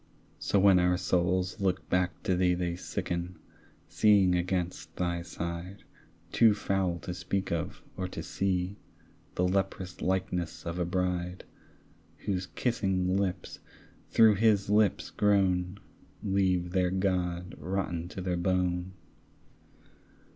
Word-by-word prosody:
So - - +1
when 95 -1 +6
our 90 0 +3
souls 90 +2 0
look 95 -1 0
back 90 -2 0
to 95 - +1
thee 90 0 +3
They 90 -1 -2
sicken, 90 0 -4 0.5
seeing 100 -4 +4
against 90 0 -2
thy 85 -1 -1
side, 85 +2 -6 0.5
Too 110 -3 +5
foul 95 -4 0
to 90 - -5
speak 90 +2 -2
of 85 0 -3
or 95 - -3
to - - -6
see, 95 0 -1 0.6
The 90 - +2
leprous 95 -1 -2
likeness 90 -2 -2
of 85 +1 -3
a 90 - +1
bride, 90 0 -2 0.8
Whose 95 -2 -1
kissing 95 -6 0
lips 95 -2 -2 0.5
through 110 -3 +6
his 105 -2 +3
lips 105 -1 +2
grown 95 -2 +2 0.4
Leave 95 -3 +1
their 90 -1 +2
God 90 -2 -1
rotten 85 0 -2
to 95 - -7
the 90 -1 -1
bone. 90 0 0
90 Hz, 125 wpm, -29 LUFS, 90-95 Hz, 0.8 s, when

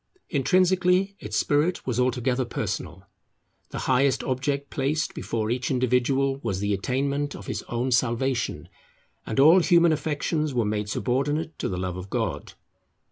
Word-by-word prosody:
Intrinsically, 185 +5 +2
its 105 0 -4
spirit 150 +5 +1
was 125 -2 -1
altogether 125 0 +1
personal; 95 -5 -4 0.6
the - - -6
highest 130 +1 +2
object 140 +2 -2
placed 155 +7 -1
before 115 - -3
each 125 0 -1
individual 130 +2 +1
was 95 -8 -2
the 100 +1 0
attainment 140 +7 -1
of - - -10
his - - -3
own 120 +2 -1
salvation, 125 0 0 0.6
and 110 - -1
all 160 +7 +8
human 170 -1 +4
affections 150 -1 -1
were 120 -3 +2
made 105 0 -2
subordinate 145 +8 -1
to - - -2
the 90 - -3
love 90 0 -3
of 90 +2 -8
God. - - -3
135 Hz, 145 wpm, -25 LUFS, 120-150 Hz, 0.6 s, all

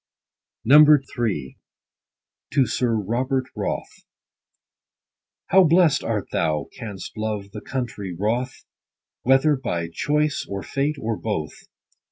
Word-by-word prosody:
III. 130 - +4 0.5
— - - -67
TO 140 -2 +4
SIR 120 -3 0
ROBERT 130 +5 -1
WROTH. - - -5 1.4
How 190 +1 +6
blest 165 -3 +4
art 110 -3 -2
thou, 75 -3 -1
canst 105 -7 -8
love 105 -2 -4
the 105 - -8
country, 120 -8 -4
WROTH, 110 +8 -2 0.6
Whether 135 +4 +4
by 85 -11 -3
choice, 150 0 0
or 100 -1 -4
fate, 145 +2 -1
or 110 -1 -2
both 80 -9 -3
120 Hz, 110 wpm, -23 LUFS, 100-140 Hz, 1.4 s, How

